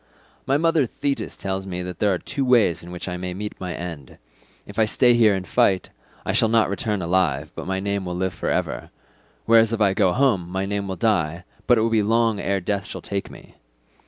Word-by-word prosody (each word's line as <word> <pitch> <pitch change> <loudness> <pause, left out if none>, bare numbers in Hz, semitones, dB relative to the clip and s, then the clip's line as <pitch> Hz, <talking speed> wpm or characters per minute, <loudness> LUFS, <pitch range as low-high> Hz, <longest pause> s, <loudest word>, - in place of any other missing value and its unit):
"My 135 +1 +3
mother 160 -4 +2
Thetis 140 +3 -3
tells 95 0 -3
me 90 -1 -4
that 90 0 -7
there 105 - +3
are 95 - +1
two 140 - -3
ways 120 -9 +3
in 85 - -11
which 90 +1 -6
I 90 -1 -3
may 90 0 -5
meet 105 +2 -6
my 90 -1 -4
end. 85 -7 -8 0.5
If - - -7
I 110 - +5
stay 120 +3 +4
here 110 -4 +4
and 95 -1 -5
fight, 95 +2 +2 0.3
I - - 0
shall 110 - +3
not 115 -2 +3
return 100 -1 -2
alive 80 -5 0
but - - -7
my 95 0 -1
name 100 0 -2
will 90 0 -4
live 95 0 -1
for - - -3
ever: - - -2 0.6
whereas 115 0 +5
if 115 - -1
I 100 -3 +3
go 95 -3 +3
home 105 -8 +1
my 95 +2 -2
name 100 0 -2
will 95 - -3
die, 85 -4 0 0.2
but 120 - +5
it - - +2
will 115 +1 +1
be 110 -1 +3
long 115 0 +2
ere 100 0 0
death 100 +1 -2
shall - - -7
take 100 -1 -4
me. - - -15
100 Hz, 230 wpm, -23 LUFS, 90-115 Hz, 0.6 s, I